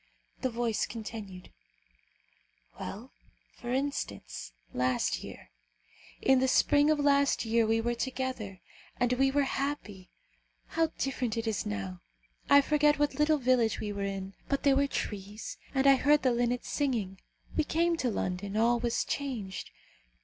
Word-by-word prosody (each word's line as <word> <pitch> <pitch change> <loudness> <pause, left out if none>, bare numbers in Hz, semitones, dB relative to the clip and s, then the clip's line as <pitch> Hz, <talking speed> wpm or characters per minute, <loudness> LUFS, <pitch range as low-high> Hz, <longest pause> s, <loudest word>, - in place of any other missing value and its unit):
The 260 - +1
voice 235 -2 -1
continued, 210 -5 -8 1.3
"Well, 205 +6 -7 0.4
for 240 - -6
instance; 100 - -3 0.2
last 125 - 0
year. - - -10 0.7
In 265 -1 +5
the 260 - +2
spring 290 +3 +4
of 310 - +4
last 280 -3 +3
year 225 0 +2
we 225 +1 +2
were 240 +1 0
together, 250 -6 -4 0.4
and 245 0 +2
we 270 +2 +3
were 285 +1 +2
happy. 265 -9 -3 0.6
How 330 0 +2
different 250 -4 -1
it 230 - -1
is 220 -2 -1
now! 95 -3 -4 0.5
I 280 0 +8
forget 295 +1 +3
what 295 0 0
little 305 +1 +4
village 250 -4 +2
we 210 - -3
were 200 - -4
in, 195 -1 -4 0.2
but 275 - 0
there 280 -1 +5
were 280 +1 +3
trees, 205 -4 -5 0.2
and 265 0 +2
I 275 -1 +7
heard 295 +2 +4
the 255 - +4
linnets 245 +1 0
singing. 225 -10 -1 0.4
We 315 - +3
came 335 +3 +1
to 255 - 0
London; 195 0 -2
all 235 +2 +3
was 235 -1 0
changed. 235 -10 -4
240 Hz, 150 wpm, -30 LUFS, 205-275 Hz, 1.3 s, I